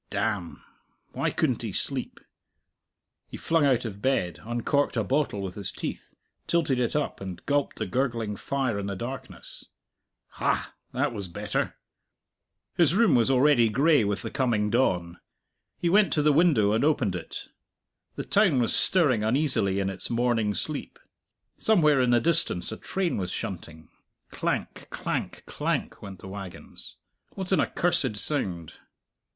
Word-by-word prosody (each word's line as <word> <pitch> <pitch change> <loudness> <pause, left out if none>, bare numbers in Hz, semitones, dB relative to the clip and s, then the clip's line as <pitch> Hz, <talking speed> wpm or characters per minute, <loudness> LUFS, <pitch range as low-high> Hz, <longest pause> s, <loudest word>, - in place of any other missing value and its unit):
Damn! 100 -7 -2 0.5
Why - - -1
couldn't - - 0
he - - -4
sleep? - - -3 1.1
He - - -8
flung 165 -3 +2
out 125 -3 +2
of 100 -2 -6
bed, 90 - 0
uncorked 120 +4 0
a 110 - +2
bottle 130 -3 0
with 95 -2 -4
his 100 -2 -4
teeth, - - -6 0.3
tilted 155 -7 +1
it 120 +2 0
up, 150 -8 -1
and 95 -2 -7
gulped 145 -1 0
the 110 - -2
gurgling 115 -1 -1
fire 130 -1 -1
in 100 - -4
the 100 - -3
darkness. 125 +7 -8 0.6
Ha! - - -1 0.2
that 130 +1 0
was 100 -4 -4
better. 85 - -2 1.0
His 170 -1 +4
room 230 +1 +4
was 120 +1 +4
already 130 -3 +4
gray 140 +3 +4
with 100 -1 -2
the - - -5
coming 110 -6 +1
dawn. 90 -8 +1 0.6
He 175 - -1
went 200 +3 +4
to 150 - +2
the 150 0 +4
window 140 - +4
and 110 +4 +2
opened 130 -10 +2
it. 85 - -7 0.7
The - - -4
town 190 -10 +3
was 120 - +1
stirring 145 - +3
uneasily 110 -5 +1
in 95 - 0
its 95 - -3
morning 115 -3 +1
sleep. - - -4 0.6
Somewhere 150 -10 +4
in 125 - +2
the 120 0 +5
distance 150 - 0
a 110 - -5
train 190 -3 -2
was 90 -3 -2
shunting; 80 +1 -6 0.4
clank, - - -3
clank, - - -4
clank - - -2
went 100 -2 -8
the - - -9
wagons. 95 -2 -9 0.4
What 190 -1 -5
an 190 - +4
accursed 135 -10 +1
sound! 90 - -2
120 Hz, 155 wpm, -27 LUFS, 100-145 Hz, 1.1 s, the